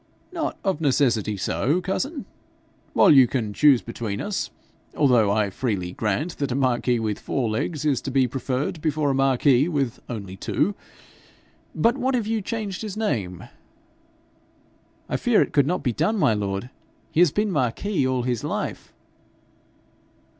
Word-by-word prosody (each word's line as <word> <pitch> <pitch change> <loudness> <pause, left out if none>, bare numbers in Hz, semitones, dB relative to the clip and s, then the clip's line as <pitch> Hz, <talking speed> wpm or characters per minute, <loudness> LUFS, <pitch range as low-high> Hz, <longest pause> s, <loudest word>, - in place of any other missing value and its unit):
'Not 330 -2 -3
of 190 -5 -1
necessity 120 -8 +1
so, 135 - 0
cousin, 265 - -3 0.7
while - - +6
you 135 -4 +7
can 115 -5 -2
choose 140 0 +5
between 115 -3 -4
us; 205 -1 -3 0.5
although 125 -8 +4
I 100 -1 +1
freely 95 -5 -2
grant 115 - -2
that 140 -2 -1
a - - -1
marquis 125 -2 +1
with 110 -2 -2
four 130 -4 -2
legs 150 +7 -2
is 140 -4 +1
to - - -5
be 135 -1 +2
preferred 135 +5 -3
before 150 -2 0
a - - 0
marquis 135 +1 +3
with 140 -8 -1
only 100 -6 -6
two. 200 - 0 1.0
But 235 +4 +2
what 260 +1 +1
if 235 -4 0
you 220 0 -1
changed 205 -2 -4
his 215 -2 -5
name?' 100 - -2 1.6
'I - - -1
fear - - +3
it - - -8
could 140 -1 +3
not 180 +3 -1
be 125 - 0
done, 170 - 0
my 120 - +3
lord. 100 +3 -3 0.4
He - - 0
has 175 -4 +6
been 210 +3 0
Marquis 140 - 0
all 130 -1 0
his 120 -3 -2
life.' - - -4
135 Hz, 160 wpm, -24 LUFS, 115-180 Hz, 1.6 s, you